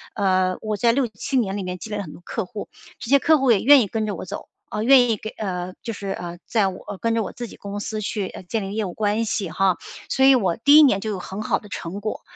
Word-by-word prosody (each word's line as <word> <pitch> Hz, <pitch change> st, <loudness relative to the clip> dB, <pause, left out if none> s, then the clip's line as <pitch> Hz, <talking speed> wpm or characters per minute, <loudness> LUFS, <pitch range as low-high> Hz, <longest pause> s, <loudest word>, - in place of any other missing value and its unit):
呃， 185 Hz, -3 st, +1 dB
我 215 Hz, -1 st, -2 dB
在 235 Hz, +3 st, +3 dB
6-7 245 Hz, +1 st, -1 dB
年 200 Hz, -4 st, 0 dB
里 200 Hz, -, -3 dB
面 180 Hz, 0 st, -4 dB
积 220 Hz, -, -9 dB
累 210 Hz, -, -2 dB
了 -, -, -2 dB
很 160 Hz, -6 st, -8 dB
多 -, -, -12 dB
客 225 Hz, -, -3 dB
户， 205 Hz, +3 st, -8 dB, 0.3 s
这 240 Hz, -, -7 dB
些 280 Hz, -, +7 dB
客 315 Hz, +3 st, +4 dB
户 270 Hz, -2 st, +3 dB
也 210 Hz, -, +4 dB
愿 275 Hz, -1 st, +7 dB
意 -, -, -3 dB
跟 220 Hz, +2 st, -2 dB
着 205 Hz, -, -2 dB
我 -, -, -7 dB
走。 195 Hz, +2 st, -7 dB, 0.3 s
嗯， 215 Hz, -, -1 dB
愿 250 Hz, -2 st, +6 dB
意 220 Hz, -, +1 dB
给 220 Hz, +2 st, -7 dB
呃， 185 Hz, -3 st, -4 dB
就 230 Hz, -, -3 dB
是， 200 Hz, -2 st, -7 dB
呃， 175 Hz, 0 st, -5 dB
在 215 Hz, -4 st, +2 dB
我 190 Hz, +1 st, -8 dB
跟 230 Hz, -1 st, +1 dB
着 230 Hz, -, +1 dB
我 -, -, -6 dB
自 240 Hz, -, -6 dB
己 -, -, -12 dB
公 205 Hz, 0 st, -6 dB
司 215 Hz, +1 st, -4 dB
去， 200 Hz, -1 st, -3 dB
呃， -, -, -9 dB
建 215 Hz, +4 st, -2 dB
立 195 Hz, +1 st, -5 dB
业 215 Hz, 0 st, -1 dB
务 180 Hz, -, -5 dB
关 215 Hz, +1 st, 0 dB
系 205 Hz, -5 st, -2 dB
哈， 190 Hz, 0 st, +2 dB, 0.3 s
所 265 Hz, -, +3 dB
以 270 Hz, -, +8 dB
我 190 Hz, -9 st, +2 dB
第 285 Hz, +5 st, +6 dB
1 -, -, +10 dB
年 225 Hz, -9 st, +4 dB
就 220 Hz, -, -3 dB
有 200 Hz, -, -3 dB
很 190 Hz, +3 st, -6 dB
好 215 Hz, -, 0 dB
的 210 Hz, -, -14 dB
成 195 Hz, -1 st, -6 dB
果。 215 Hz, +1 st, -4 dB
210 Hz, 300 characters per minute, -23 LUFS, 195-230 Hz, 0.3 s, 1